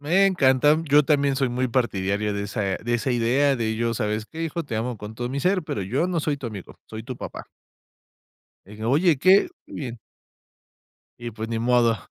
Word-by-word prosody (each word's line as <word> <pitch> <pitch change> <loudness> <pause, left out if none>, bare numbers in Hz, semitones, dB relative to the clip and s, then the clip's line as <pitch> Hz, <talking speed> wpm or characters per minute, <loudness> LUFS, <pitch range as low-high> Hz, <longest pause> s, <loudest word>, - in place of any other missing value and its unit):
Me 180 +7 +3
encanta, 145 -4 +4
yo 145 0 +4
también 140 -2 +2
soy 135 -2 +1
muy 125 +1 -1
partidario 105 -4 0
de 100 - -2
esa 105 +1 -4
de 105 +5 -2
esa 120 +3 -1
idea, 130 +4 +2
de 110 -1 -1
yo: 115 0 -1
"¿Sabes 110 -1 -2
qué, 165 +1 -7
hijo? 165 0 -3
Te 115 -6 -4
amo 120 +1 -2
con 105 +1 -8
todo 120 +1 -4
mi 140 +2 -3
ser, 185 +2 +1
pero 105 -9 -4
yo 130 - 0
no 170 -3 0
soy 150 -1 -1
tu 135 -3 -7
amigo, 100 -5 -9
soy 110 0 -8
tu 130 - -6
papá". - - -7 1.2
Eh, 105 +2 -12
oye, 150 +6 +3
qué 190 - +5 0.2
que - - -14
bien. 120 -5 -6 1.2
Y 120 -1 -6
pues, 110 +1 -6
ni 115 -1 -2
modo. 120 -1 +3
120 Hz, 205 wpm, -24 LUFS, 110-145 Hz, 1.2 s, qué